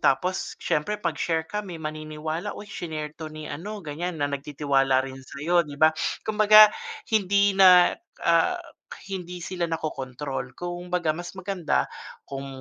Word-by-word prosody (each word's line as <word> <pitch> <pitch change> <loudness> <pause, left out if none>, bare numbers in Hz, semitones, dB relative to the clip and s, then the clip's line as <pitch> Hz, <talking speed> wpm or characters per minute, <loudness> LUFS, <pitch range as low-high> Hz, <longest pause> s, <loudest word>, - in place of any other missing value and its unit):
tapos 180 +8 +1
siyempre 180 +8 -1
'pag 170 -6 -3
share 160 -1 0
ka 210 +5 -3
may 180 -3 -7
maniniwala. 155 +1 -4
Oy, 205 - -8
shinare 155 -5 -5
'to 160 -1 -6
ni 155 0 -8
ano 200 +8 -6
ganyan, 165 +4 -4
na - - +2
nagtitiwala 140 -2 +1
rin 135 0 -8
sa'yo 150 +6 0
'di 145 - -8
ba? 155 0 +7 0.3
Kumbaga 215 0 +7 0.4
hindi 200 -1 +3
na, 185 -2 +7 0.3
ah, - - +4 0.5
hindi 180 -2 -5
sila 180 -2 -2
nakokontrol 135 -5 -4
kumbaga 175 -1 -2
mas 175 +4 -5
maganda 180 - -1 0.3
kung 135 0 -7
165 Hz, 145 wpm, -25 LUFS, 150-185 Hz, 0.5 s, ba